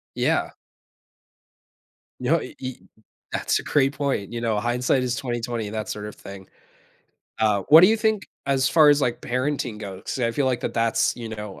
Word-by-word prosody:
Yeah. - - +1 1.7
No, 145 +6 +1
e - - -9
e 130 -1 -5 0.6
that's - - 0
a - - -6
great 135 -1 +2
point, 140 -7 -2
you 120 - -4
know, 110 -3 0
hindsight 125 +3 +1
is 125 -1 -1
20/20, 120 -4 -3
that 110 -2 -4
sort 105 0 -5
of 105 - -8
thing. 100 -1 -11 0.9
Uh, 105 -3 +2
what 160 +2 +10
do 185 - +8
you 220 +2 +3
think 220 -2 0 0.2
as 135 -1 +2
far 150 +1 +6
as, 145 0 +4
like, 120 -3 -1
parenting 125 -3 -2
goes, 95 -3 -8
'cause - - -4
I 115 -1 +1
feel 140 +1 0
like 125 -2 0
that - - -4
that's, 115 +1 +1
you 115 -2 -6
know, 105 -3 -7
120 Hz, 185 wpm, -24 LUFS, 110-140 Hz, 1.7 s, what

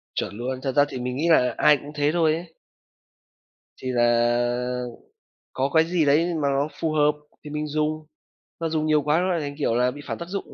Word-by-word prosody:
Chuẩn 100 - -3
luôn. 130 +3 -4
Thật 135 - -1
ra 145 +1 +5
thì 130 - -6
mình 125 +1 -3
nghĩ 165 +4 0
là 125 -6 +4
ai 150 - +5
cũng 145 +2 -10
thế 145 0 +1
thôi 160 -2 +2
ấy. 165 0 -7 1.2
Thì 130 - -6
là 120 +1 +1 0.7
có 135 +1 -1
cái 160 - +6
gì 170 -2 +1
đấy 160 +5 +3
mà 140 - +2
nó 140 +1 0
phù 160 -1 0
hợp 150 -1 +3 0.3
thì 150 - -8
mình 150 0 -3
dùng. 155 +1 -2 0.5
Nó 165 -1 -1
dùng 155 -1 -1
nhiều 155 -1 +3
quá 150 +2 +2
nó 185 - 0
lại 170 - 0
thành, 145 -1 -5
kiểu 130 -6 0
là, 125 +1 +2
bị 145 - -10
phản - - -4
tác 170 - -7
dụng. 200 +1 -5
145 Hz, 220 wpm, -24 LUFS, 125-155 Hz, 1.2 s, cái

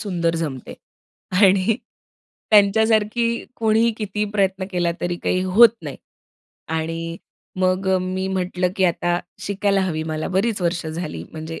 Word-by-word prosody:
सुंदर 170 -5 -1
जमते. 145 -6 -5 0.7
आणि 195 +2 +4 0.7
त्यांच्यासारखी 220 +2 +3
कोणीही 225 +1 +3
कितीही 210 -1 -2
प्रयत्न 195 -2 0
केला 175 -2 0
तरी 175 0 -2
काही 185 - +1
होत 205 +6 +7
नाही. - - -6 0.7
आणि 165 +1 -3 0.4
मग 185 +1 +1
मी 185 +1 -2
म्हटलं 180 -1 -1
की 190 - +2
आता 175 0 +1 0.2
शिकायला 200 0 0
हवी, 170 -5 -1
मला 155 0 -3
बरीच 200 +3 0
वर्षे 170 -2 -1
झाली, 155 - -5
म्हणजे 160 +1 -7
185 Hz, 130 wpm, -21 LUFS, 170-205 Hz, 0.7 s, होत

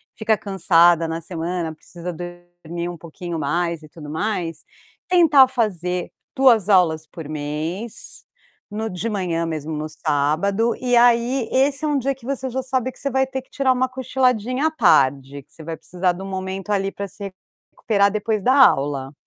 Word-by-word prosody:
fica 220 0 +1
cansada 175 -4 +3
na 165 +1 -4
semana, 170 -1 -4
precisa 175 +2 -8
dormir 175 0 -7
um 175 - -7
pouquinho 170 0 -6
mais 170 +2 -1
e 155 - -13
tudo 150 -2 -11
mais, 165 -1 -3 0.4
tentar 320 -7 +6
fazer 180 -8 -2 0.2
2 235 -7 +4
aulas 160 -5 +3
por 165 -5 -9
mês, 155 +8 -5 0.5
no 220 +2 -3
de 180 +6 -3
manhã 180 -5 -1
mesmo, 160 -1 -4
no 150 +1 -3
sábado. 155 +10 0
E 250 -1 +1
aí 240 +1 +3
esse 275 +2 +2
é - - +1
um 295 -1 +1
dia 275 +1 0
que 255 -3 -17
você 265 -1 -3
já 260 +2 -2
sabe 260 0 -1
que - - -14
você 280 - -2
vai 265 0 +2
ter 265 0 -5
que 260 - -29
tirar 270 -1 +1
uma 255 +1 +1
cochiladinha 255 +1 0
à - - -1
tarde, 140 - +2
que 150 - -25
você 160 - -11
vai 165 0 -5
precisar 180 0 -1
de 180 - -9
um 195 - -6
momento 190 +1 -5
ali, 195 -1 0
pra 200 - -5
se 195 0 -7 0.4
recuperar 200 -3 +2
depois 215 -1 -1
da 255 - +4
aula. 140 - +3
190 Hz, 180 wpm, -21 LUFS, 165-245 Hz, 0.5 s, tentar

